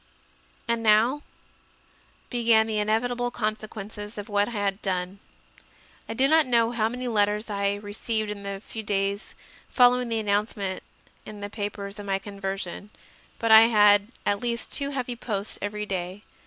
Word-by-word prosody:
4. 235 - +1
And 230 - -2
now 225 +6 +4 1.1
began 230 -3 +4
the 220 -1 -1
inevitable 245 +3 0
consequences 215 -2 -5
of 205 0 -6
what 205 0 +2
I - - -6
had 200 -1 -1
done. 185 0 -2 0.9
I 225 - -4
do 265 +3 +4
not 315 -1 +4
know 235 -2 +3
how 225 -2 +1
many 250 +1 -5
letters 210 -1 +1
I 200 0 0
received 210 +1 -3
in 205 -1 -7
the 200 -1 -5
few 220 - -7
days 200 0 -2 0.3
following 250 -1 +4
the 225 - 0
announce 210 +1 0
ment 190 -2 -3 0.4
in 210 -1 -10
the 205 0 -6
papers 205 -1 -5
of 205 - -7
my 195 -1 +1
conversion; 195 -1 -5 0.5
but 230 -1 0
I 220 +1 +10
had 205 -2 +5 0.2
at 200 0 +1
least 235 -1 -2
two 280 -1 0
heavy 255 -3 -3
posts 210 -4 -4
every 210 +1 -3
day. 185 +1 -4
210 Hz, 165 wpm, -26 LUFS, 200-230 Hz, 1.1 s, I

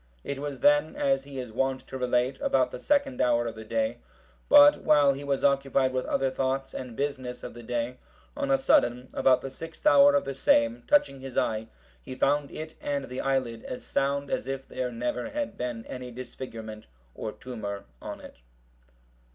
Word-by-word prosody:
It 140 - -4
was 140 -3 -5
then, 145 +2 +4
as 135 0 +1
he 140 -1 -9
is 125 -3 -5
wont 135 +3 0
to - - -11
relate, 125 +1 0
about 130 -1 +2
the - - -7
second 285 -3 +1
hour 120 -1 +3
of 115 - -3
the 110 0 -9
day; 275 - -1 0.5
but 290 0 +8
while 145 -2 +5
he 140 +1 -7
was 140 -1 -1
occupied 135 -1 +2
with 130 0 -1
other 135 -1 +1
thoughts 135 +1 -2
and 125 -3 -6
business 130 -3 -3
of - - -7
the 120 - -10
day, 120 +1 -3 0.4
on 285 -1 -2
a 270 - +5
sudden, 125 - +2
about 130 -1 +4
the 135 - -6
sixth 165 - -10
hour 285 -1 +7
of 285 - +2
the 135 - -3
same, 285 - +3
touching 290 - +3
his 130 -1 -8
eye, 110 0 0 0.3
he 130 - -8
found 145 +1 +1
it 155 0 -7
and 140 -2 -2
the 125 - -4
eyelid 130 -4 -1
as 125 - -6
sound 140 0 -1
as - - -2
if 135 0 -4
there 125 -1 -3
never 120 +1 -3
had 290 -1 -3
been 120 -2 -4
any 125 -1 -7
disfigurement 115 - -8 0.3
or 110 - -5
tumour 105 -4 -6 0.2
on - - -7
it. - - -12
135 Hz, 190 wpm, -27 LUFS, 125-145 Hz, 0.5 s, but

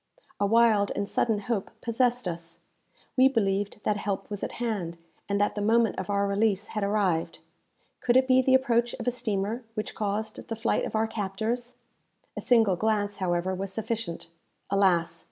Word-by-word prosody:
A 200 - +2
wild 220 -2 +4
and 200 0 -1
sudden 215 -1 +1
hope 205 -2 -2
possessed 245 -1 +1
us. 170 -1 -4 0.6
We 260 0 +6
believed 205 -5 0
that 210 - +1
help 200 0 -3
was 205 - -4
at - - -3
hand, 205 -8 -3 0.3
and 200 0 +1
that 205 - +2
the 205 - -3
moment 225 0 +2
of 190 - -5
our 200 0 +1
release 200 0 +1
had 210 -2 -3
arrived. 200 -5 0 0.6
Could 245 +1 +3
it 260 0 +4
be 260 0 +5
the 260 0 +4
approach 240 -2 +2
of - - -7
a - - +4
steamer 225 -1 -2
which 215 - -3
caused 215 +1 -3
the 225 - -3
flight 230 +1 0
of - - -5
our 220 +1 +2
captors? 225 +4 -3 0.6
A - - -4
single 225 -6 +4
glance, 205 +1 0
however, 180 0 0
was 190 +1 -3
sufficient. 220 -3 -3 0.5
Alas! 175 -4 +2
210 Hz, 175 wpm, -27 LUFS, 195-230 Hz, 0.6 s, We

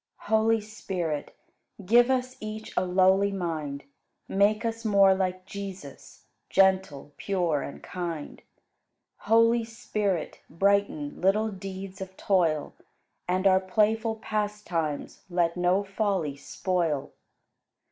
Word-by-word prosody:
107. 220 - -1
Holy 225 0 +3
Spirit, 180 -8 -4 0.5
give 240 +5 +5
us 255 -1 0
Each 215 0 -7
a - - +2
lowly 190 +2 +3
mind; 155 -7 -3 0.4
Make 205 +3 +2
us 230 0 -3
more 200 -3 +5
like 185 -1 -2
Jesus, 195 -7 -9 0.3
Gentle, 190 -7 +2
pure, 175 -7 0
and - - -8
kind. 170 -4 -5 0.9
Holy 230 +1 +5
Spirit, 210 -6 -3
brighten 195 -5 0
Little 210 +4 +3
deeds 195 0 -7
of 190 0 -8
toil, 165 -7 +1 0.5
And 185 +2 0
our 190 -1 +6
playful 220 +4 +1
pastimes 210 -8 -3
Let 175 -1 +1
no 180 +2 +2
folly 195 -7 -1
spoil. 160 0 -2
190 Hz, 110 wpm, -27 LUFS, 175-210 Hz, 0.9 s, our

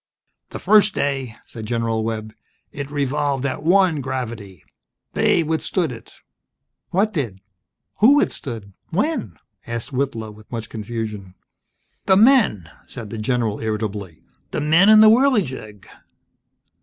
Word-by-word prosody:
"The - - -6
first 210 -1 +4
day 135 -5 -2
" - - -35
said 110 -2 -9
General 115 -1 -1
Webb, 110 -1 -4 0.4
"it 140 -1 -6
revolved 145 -1 -1
at 135 - -2
one 175 -2 +3
gravity! 115 - -6 0.5
They 170 - +2
withstood 160 +1 -1
it!" 115 -2 -12 0.7
"What 205 +4 +1
did? 120 - -3 0.6
Who 250 +7 +6
withstood? 115 - -2 0.2
When?" 185 - -2 0.3
asked 115 +4 -5
Whitlow, 120 -5 -2
with 105 0 -17
much 115 -2 -5
confusion. 105 -4 -6 0.7
"The 190 - +5
men!" 215 - +4 0.2
said 115 -5 -8
the 115 - -5
general, 115 -2 -1
irritably. 105 -5 -4 0.3
"The - - -3
men 165 +7 +5
in 215 0 +8
the 220 - +8
Whirligig!" 185 - +1
125 Hz, 130 wpm, -21 LUFS, 110-165 Hz, 0.7 s, in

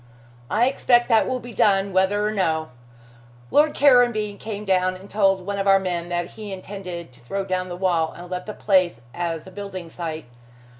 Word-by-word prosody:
"I 230 +3 +3
expect 245 -2 +3
that 225 -2 +4
will 255 0 -1
be 245 -1 -10
done, 195 -2 +2
whether 195 +3 +2
or 210 - 0
no. 160 -6 0 0.8
Lord 300 +1 +4
Caranby 240 -7 +4
came 210 -1 -6
down 185 -1 +2
and 190 +2 -12
told 195 -3 +2
one 200 0 -3
of 195 - -1
our 195 0 +7
men 175 -2 -3
that 175 0 -2
he 215 -2 -8
intended 185 -4 -7
to 125 - -15
throw 195 +12 -4
down 185 -1 -2
the 175 - -6
wall 175 -4 +1
and 175 +1 -10
let 180 +1 -5
the 210 - -4
place 185 - +2
as 170 -2 -3
a 190 - -11
building 190 -3 -7
site. 160 -3 -5
190 Hz, 195 wpm, -23 LUFS, 175-210 Hz, 0.8 s, our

